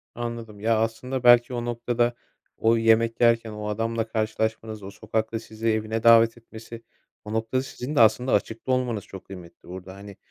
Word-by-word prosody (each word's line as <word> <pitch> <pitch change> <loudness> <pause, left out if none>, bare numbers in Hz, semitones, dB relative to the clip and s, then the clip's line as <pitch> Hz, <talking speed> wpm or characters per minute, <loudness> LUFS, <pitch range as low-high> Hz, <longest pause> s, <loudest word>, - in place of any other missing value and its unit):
Anladım. 115 -3 -6
Ya 110 +2 +1
aslında 120 +4 -2
belki 120 0 +6
o 120 -1 -3
noktada 120 0 0 0.4
o 115 +1 +3
yemek 115 +1 +2
yerken 115 -1 +3
o 105 0 -6
adamla 115 +2 -2
karşılaşmanız, 110 -1 -3
o 95 - -8
sokakta 110 +2 -3
sizi 110 0 -6
evine 110 0 -1
davet 115 0 +6
etmesi, 115 0 -11 0.4
o 105 - -6
noktada 115 +4 -1
sizin 135 +2 -6
de - - +3
aslında 115 +3 +4
açıkta 110 +5 -1
olmanız 125 -5 -1
çok 95 - -11
kıymetli 90 -3 -13
burada. 95 +1 -9
Hani, 100 0 -12
115 Hz, 170 wpm, -25 LUFS, 110-120 Hz, 0.4 s, belki